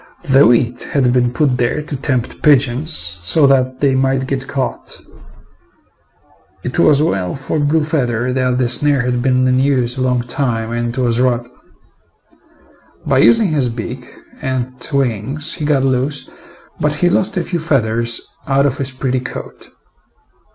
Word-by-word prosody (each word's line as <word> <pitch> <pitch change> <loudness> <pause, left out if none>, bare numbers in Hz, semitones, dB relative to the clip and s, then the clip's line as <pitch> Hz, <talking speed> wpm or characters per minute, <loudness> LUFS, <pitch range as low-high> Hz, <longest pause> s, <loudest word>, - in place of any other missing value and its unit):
The 135 -5 +5
wheat 120 +1 +2
had 130 -4 +2
been 125 -1 +2
put 130 -1 +1
there 125 +5 -1
to 150 - -6
tempt 130 -3 -3
pigeons 140 0 +2 0.3
so 145 - +3
that 130 -1 +2
they 140 -2 +3
might 130 0 +1
get 135 0 -3
caught. 135 -3 -4 1.6
It 125 +7 -3
was 150 -3 +4
well 95 - -1
for 135 +3 -3
Blue 150 +2 +1
feather 125 -5 -1
that 125 -1 0
the 125 -1 +1
snare 140 +2 +2
had 125 -1 -1
been 130 0 +2
in 130 0 +2
use 130 -2 0
a - - -2
long 125 -1 +1
time 120 -3 -2
and 120 +1 -3
was 120 -2 +1
rotten. 120 -1 -1 1.5
By - - +2
using 120 - +5
his 145 -5 0
beak 120 +2 -6 0.3
and 130 -1 -3 0.2
wings 135 +3 -1
he 150 - -4
got 145 -3 +2
loose, 135 +2 -1 0.5
but 150 0 +1
he 175 +4 +1
lost 190 +2 0
a 175 - 0
few 175 0 -3
feathers 120 -7 0 0.2
out 135 +1 +2
of 135 -2 -1
his 135 -1 -1
pretty 130 0 -2
coat. 125 - -9
130 Hz, 160 wpm, -16 LUFS, 125-140 Hz, 1.6 s, The